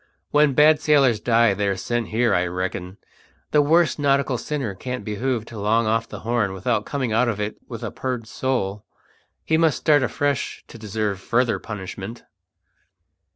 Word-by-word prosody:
When 150 -1 +4
bad 150 +1 +6
sailors 135 -8 +4
die 115 -2 +3
they're 100 -1 -1
sent 120 0 -2
here, 120 +2 +1
I 90 0 +2
reckon. 90 +1 -4 0.5
The 150 - +5
worst 165 +2 +3
nautical 140 -3 +1
sinner 140 -9 -3
can't 125 +6 -6
be 105 -2 -4
hove 125 -2 -1
to 115 -2 -9
long 110 +3 +2
off 115 +1 0
the - - -8
Horn 115 -4 0
without 105 +3 -1
coming 130 -6 -2
out 120 +3 +3
of 105 -3 -3
it 105 +1 -3
with - - -7
a - - -4
purged 125 -3 -4
soul. 105 -6 -2 0.6
He 160 - +2
must 160 -4 +3
start 150 -3 +3
afresh 140 +3 -1
to 115 - -11
deserve 105 -2 -2
further 120 +4 +1
punishment." 105 +2 -7
115 Hz, 170 wpm, -23 LUFS, 105-135 Hz, 0.6 s, bad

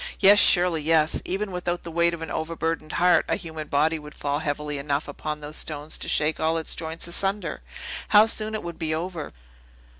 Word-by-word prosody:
"Yes; 205 +1 +7
surely 175 -3 +5
yes! 155 0 +2
Even 195 +2 -2
without 180 -1 -3
the 170 - -7
weight 170 +1 +2
of 165 - -8
an - - -6
overburdened 165 0 -3
heart, 180 +1 +4
a - - +2
human 160 -4 -7
body 155 +3 +1
would 150 0 -12
fall 145 0 -2
heavily 150 -1 -3
enough 140 +1 -2
upon 150 +1 -5
those 150 +1 -6
stones 150 0 -3
to - - -4
shake 155 +1 +1
all 160 +1 +1
its 160 - 0
joints 160 0 -4
asunder. 195 +4 -1 0.5
How 210 0 +7
soon 220 -1 +1
it 215 - -4
would 170 0 -7
be 155 -2 -1
over!" 165 -2 -5
160 Hz, 200 wpm, -25 LUFS, 155-175 Hz, 0.5 s, Yes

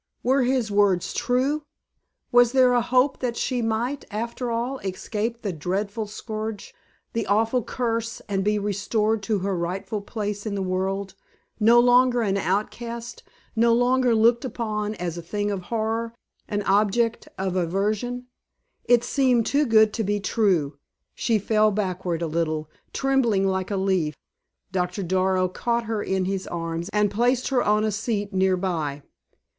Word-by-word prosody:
Were 265 +2 +3
his 250 -3 +1
words 200 -3 +2
true? 255 +5 +1 0.7
Was 245 0 +5
there 255 -2 +5
a 245 - +3
hope 255 +3 +2
that 240 -2 -2
she 250 -2 -1
might, 235 +5 -1
after 235 +3 -3
all 240 +3 -2
escape 215 +4 -4
the 200 -4 -2
dreadful 200 +7 -2
scourge, 215 0 -6 0.4
the 230 -1 -2
awful 225 +5 +2
curse, 230 -1 -2
and 195 -2 -1
be 210 +1 +2
restored 210 +2 0
to 205 +2 0
her 200 -1 0
rightful 185 +5 -3
place 205 0 -4
in 205 - -2
the 195 - -1
world, 190 +1 -2 0.5
no 230 +2 +6
longer 245 0 +4
an 195 -2 0
outcast, 230 +5 -3 0.3
no 230 +1 +4
longer 245 0 +3
looked 235 +3 +4
upon 215 -4 -3
as 175 -3 -4
a - - -6
thing 205 +4 -2
of 190 -3 -4
horror, 230 0 -2 0.3
an 205 0 -2
object 215 +4 +1
of 190 -1 -2
aversion? 210 +8 -1 0.6
It 240 -1 +4
seemed 250 -3 +2
too 290 0 +2
good 220 -2 +5
to 225 - -1
be 205 +1 0
true. 180 -9 +1 0.3
She 230 -2 +1
fell 215 +1 +3
backward 185 -4 -2
a - - +1
little, 155 -1 -2 0.2
trembling 250 -8 +2
like 190 -1 -1
a 200 - -1
leaf. 185 -6 0 0.6
Doctor 180 +1 -1
Darrow 185 +1 +1
caught 235 +5 -1
her 220 -2 -2
in 190 -2 -1
his 190 0 -2
arms 165 +1 -4
and 210 -1 +1
placed 245 +4 +1
her 260 -3 +2
on 210 +1 +2
a 215 - +1
seat 205 -1 -2
near 190 0 +2
by. 155 -6 -2
210 Hz, 160 wpm, -24 LUFS, 190-235 Hz, 0.7 s, no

